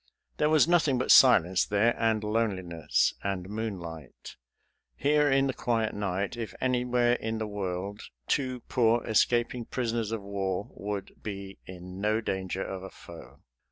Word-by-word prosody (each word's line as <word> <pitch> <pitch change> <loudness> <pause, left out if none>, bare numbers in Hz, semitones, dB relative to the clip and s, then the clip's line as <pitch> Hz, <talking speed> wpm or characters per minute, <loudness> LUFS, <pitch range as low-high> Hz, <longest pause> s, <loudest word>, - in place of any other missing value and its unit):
There 150 - +2
was 155 0 +5
nothing 160 -6 +3
but 130 - +1
silence 95 -8 +6
there, 105 +3 +2
and 110 -1 +1
loneliness, 95 -7 0
and 95 -2 -3
moonlight. 90 - -7 0.6
Here 150 +1 +2
in 135 0 +3
the 135 - -1
quiet 115 -3 -1
night, 100 +1 -2
if 115 -2 -6
anywhere 125 -1 +2
in 110 -2 -2
the 110 - -2
world, 100 0 -4 0.3
two 130 -3 -1
poor 115 -1 +1
escaping 120 +2 +1
prisoners 115 -3 -2
of 115 -3 -3
war 100 -1 -3
would 100 -1 -6
be 100 -2 -7
in 90 +1 -9
no 105 +1 +1
danger 95 -3 -3
of 95 -1 -6
a 95 - -8
foe. 85 -3 -13
110 Hz, 150 wpm, -28 LUFS, 95-120 Hz, 0.6 s, silence